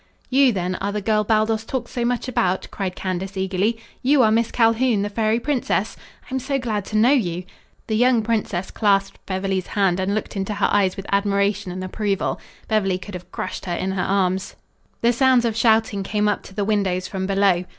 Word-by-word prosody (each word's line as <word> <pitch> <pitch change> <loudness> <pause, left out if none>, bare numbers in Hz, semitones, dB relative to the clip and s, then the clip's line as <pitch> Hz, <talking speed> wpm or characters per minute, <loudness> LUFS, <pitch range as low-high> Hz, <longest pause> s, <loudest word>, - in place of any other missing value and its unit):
"You, 265 0 +5
then, 185 -3 -2
are 200 +1 -1
the 210 - -2
girl 215 +1 +1
Baldos 220 0 +1
talks 245 +1 -4
so 240 - -2
much 245 +1 -1
about?" 190 -7 0
cried 190 -2 -3
Candace 190 +1 -4
eagerly. 190 +4 0 0.2
"You 270 0 +4
are 215 - +4
Miss 230 +1 +2
Calhoun, 230 -2 +2
the 205 - -3
fairy 220 +1 +1
princess? 265 0 -1 0.3
I - - -11
am 265 - +1
so 270 +2 -1
glad 220 -6 -2
to 215 - -2
know 235 +5 +5
you." 180 -10 +1 0.4
The 220 - -1
young 245 0 +3
princess 210 -5 -1
clasped 200 -2 +1
Beverly's 190 -1 -2
hand 190 -3 +1
and 190 +2 0
looked 215 - -4
into 195 +1 -2
her - - +1
eyes 195 -2 +2
with 195 - -6
admiration 200 -1 +1
and 185 +1 -5
approval. 195 +1 -2 0.3
Beverly 195 -4 +1
could 195 +2 -10
have 180 0 -9
crushed - - -5
her 175 -2 -2
in 190 +2 -2
her 190 -1 -1
arms. 190 0 0 0.5
The 235 +1 +3
sounds 255 -1 +4
of 225 -2 0
shouting 220 -3 +2
came 210 +2 0
up 210 - 0
to 190 - -13
the 205 - -1
windows 190 -4 0
from 190 -1 -3
below. 195 -2 +2
205 Hz, 205 wpm, -22 LUFS, 190-225 Hz, 0.5 s, You